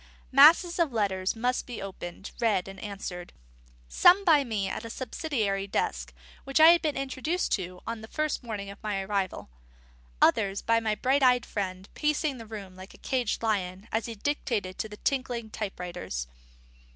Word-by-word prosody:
Masses 325 +6 +7
of 330 -5 +2
letters 195 -4 0
must 245 +3 -1
be 245 -3 -6
opened, 195 -1 -7
read, 210 -6 +1
and 195 0 -9
answered; 190 -4 -6 0.5
some 365 - +5
by 305 -5 +6
me 215 -6 -2
at 215 - -4
a 230 - -7
subsidiary 225 - -2
desk 60 - -2 0.3
which 275 - -2
had 330 +2 +8
been 300 -3 -1
introduced 275 - -1 0.3
on 230 0 -4
the 305 +7 -2
morning 210 -5 -5
of 200 - -13
my 210 -2 -2
arrival; 190 - -3 0.7
others 200 +1 +3
by 230 0 +3
my 220 -2 0
bright 265 +6 +1
eyed 250 -2 +4
friend, 190 -2 -4
pacing 300 -3 0
the 225 - -9
room 200 -4 -8
like 185 +1 -12
a - - -21
caged 250 -4 -1
lion 195 -2 -1
as 220 +1 -1
he 230 - -6
dictated 210 -6 -2
to 220 - -3
the 210 - -10
tinkling 245 -4 -2
type 210 -4 -5
writers. 175 - -4
220 Hz, 165 wpm, -28 LUFS, 195-265 Hz, 0.7 s, had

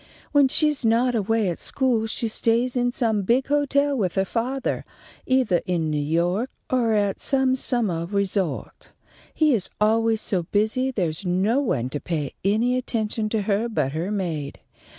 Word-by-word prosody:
When 285 -2 +5
she's 300 0 +1
not 235 +2 +3
away 225 -1 +1
at 170 - -4
school 245 -5 +1
she 230 +1 -2
stays 235 +3 +1
in 245 0 +1
some 225 -4 0
big 240 +7 +2
hotel 285 0 +2
with 190 -8 -1
her 190 0 +2
fathah, 250 +6 -2 0.5
eithah 255 -9 +2
in 165 -4 0
New 150 -1 0
York 175 - 0 0.2
or 240 -3 +2
at 205 -2 0
some 265 -1 +2
summah 215 -11 0
resort. 195 -5 -2 0.4
He 310 -3 +3
is 210 -6 0
always 225 +1 +2
so 190 -4 -1
busy 220 +6 +1
there's 175 -9 -2
no 190 +7 +1
one 130 - -1
to 145 - -3
pay 150 -5 -3
any 230 +6 +2
attention 220 -3 -2
to 215 -1 -1
her 210 +3 0
but 150 - -1
her 165 +6 -3
maid. 165 -9 -3
220 Hz, 165 wpm, -24 LUFS, 185-250 Hz, 0.5 s, When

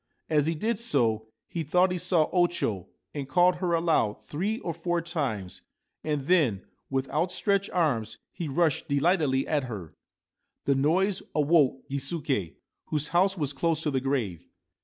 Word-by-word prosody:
As 150 -1 +3
he 165 - 0
did 220 +6 -1
so 115 - +1 0.2
he 170 - -4
thought 180 +5 +3
he 180 - -2
saw 170 -3 +2
O 175 -1 +4
Cho, 105 - -3 0.2
and 140 -2 -5
called 175 +4 +4
her 175 -1 -1
aloud 165 -11 +1
three 195 +9 -2
or 170 - -3
four 175 +1 -1
times, 140 - -3 0.4
and 150 -3 -2
then 140 - +2 0.2
with 135 0 -1
outstretched 195 +5 +1
arms 120 -11 0
he 170 - -5
rushed 155 +1 +1
delightedly 140 -2 +2
at 150 -4 0
her. 100 -10 -7 0.7
The 140 - +3
noise 180 +8 +2
awoke 145 -3 +3
Gisuke, 135 - -2 0.3
whose 150 -1 -1
house 190 +3 +2
was 145 -3 -1
close 160 +2 0
to 150 - 0
the 130 -1 0
grave. 115 - -2
150 Hz, 160 wpm, -27 LUFS, 135-175 Hz, 0.7 s, O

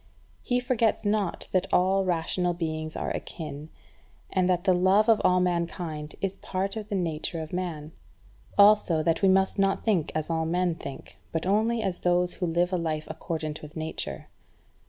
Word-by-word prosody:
He 245 0 0
forgets 235 -4 +1
not 205 -3 0
that 185 - 0
all 190 +2 +3
rational 175 0 0
beings 155 -2 -3
are - - -2
akin, 150 -2 -6 0.6
and 185 -1 +2
that 175 -1 +1
the 185 - +4
love 190 +4 +4
of 225 -2 +5
all 180 0 +4
mankind 170 -3 -2
is 195 -1 -2
part 195 +2 -3
of 215 -1 -6
the 205 - -1
nature 165 -2 -2
of 160 +1 -7
man; 165 -4 -4 0.7
also 200 -6 +5
that 165 0 +1
we 195 - +5
must 190 +1 +3
not 195 0 +2
think 190 -9 +1
as 155 -1 -1
all 160 -1 -1
men 175 +1 +1
think, 140 -4 -9
but 165 +1 -2
only 220 +4 +2
as 180 -2 -2
those 180 0 +2
who 180 - -2
live 175 +2 +1
a - - +2
life 155 -2 -2
accordant 160 -1 -4
with 150 0 -11
nature. 160 0 -5
180 Hz, 175 wpm, -27 LUFS, 160-195 Hz, 0.7 s, of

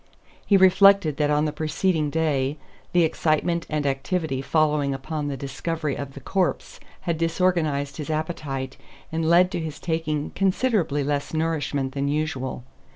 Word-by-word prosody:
He 200 - +4
reflected 190 -4 +5
that 150 -1 +1
on 150 +1 +2
the 150 - 0
preceding 155 +1 0
day 145 -2 0 0.3
the 175 -1 +4
excitement 165 +2 0
and 150 -1 -1
activity 135 +1 -1
following 150 -2 +1
upon 150 +1 -4
the 140 -1 -3
discovery 150 +3 -3
of 140 -1 -6
the - - -7
corpse 185 +6 -1 0.2
had 170 -3 -2
disorganized 165 -5 0
his 150 -1 -5
appetite 150 -4 -3 0.3
and 160 0 0
led 180 +2 +5
to 180 - -2
his 160 -2 -5
taking 160 -3 -2
considerably 190 - +1
less 145 +2 -2
nourishment 150 -4 -1
than 140 +1 -2
usual. 140 -4 -2
155 Hz, 150 wpm, -24 LUFS, 145-170 Hz, 0.3 s, reflected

